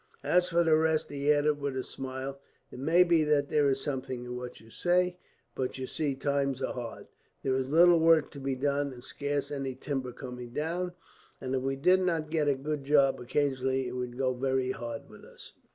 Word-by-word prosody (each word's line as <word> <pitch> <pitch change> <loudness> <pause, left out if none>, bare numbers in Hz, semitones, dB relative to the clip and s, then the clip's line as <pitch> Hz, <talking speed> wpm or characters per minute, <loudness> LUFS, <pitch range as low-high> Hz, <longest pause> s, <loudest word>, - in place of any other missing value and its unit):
"As 180 0 +3
for 170 -1 +3
the 160 -1 +4
rest," 160 0 +1
he 145 +1 +1
added 145 0 +2
with 140 -2 -3
a 130 - -1
smile, 135 +1 -6 0.3
"it - - -9
may 165 +6 +5
be 170 -3 +3
that 150 -2 +2
there 145 -2 +3
is 135 0 0
something 130 -3 -4
in 125 0 -5
what 125 0 -7
you 115 0 -17
say; 180 +3 +1 0.4
but 130 0 -3
you 130 - -4
see, 145 +1 -2
times 140 -1 0
are 135 - -2
hard. 120 -2 -6 0.4
There 135 - +1
is 130 0 -1
little 170 +2 +7
work 160 -2 +4
to 140 - -9
be 135 -1 -2
done, 140 +1 0
and 120 -1 -12
scarce 145 +1 -3
any 135 -2 -3
timber 130 -1 -3
coming 125 -1 -8
down; 175 +5 -2 0.5
and 130 0 -4
if 130 - +1
we 135 +1 -1
did 180 +7 +4
not 165 -4 -1
get 155 -3 +1
a 140 - +3
good 145 +1 -3
job, 140 -1 +4
occasionally, 130 0 0
it - - -4
would 125 -1 -4
go 130 -1 +1
very 130 0 0
hard 115 -2 -6
with - - -15
us." - - -13
140 Hz, 215 wpm, -30 LUFS, 130-155 Hz, 0.5 s, little